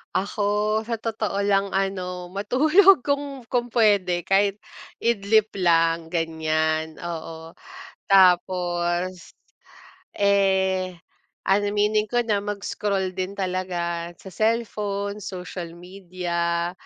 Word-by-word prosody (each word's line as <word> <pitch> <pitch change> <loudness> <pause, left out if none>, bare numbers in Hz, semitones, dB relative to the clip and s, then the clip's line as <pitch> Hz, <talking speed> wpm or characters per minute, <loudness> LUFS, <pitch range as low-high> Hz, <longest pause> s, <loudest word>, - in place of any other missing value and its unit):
Ako 200 +2 -1 0.4
sa 230 0 -4
totoo 220 -3 -2
lang 200 -1 +1
ano, 185 -2 -2
matulog 310 - +5
kung 280 -2 -3
kung 245 -1 -1
pwede 195 -6 +2
kahit 200 +1 +2 0.4
idlip 220 -1 +2
lang 165 -2 +2
ganyan, 160 -1 -1
oo, 165 -1 -7 0.5
tapos, 180 - +2 0.8
eh, 190 -2 +2 0.5
an 195 +2 +4
aminin 210 +1 +2
ko 240 - +2
na 205 -2 +1
mag-scroll 200 -2 -2
din 185 0 -3
talaga 180 -3 -3
sa - - -13
cellphone, 210 -1 -1
social 180 -2 -6
media, 175 -2 -3
190 Hz, 95 wpm, -24 LUFS, 175-205 Hz, 0.8 s, matulog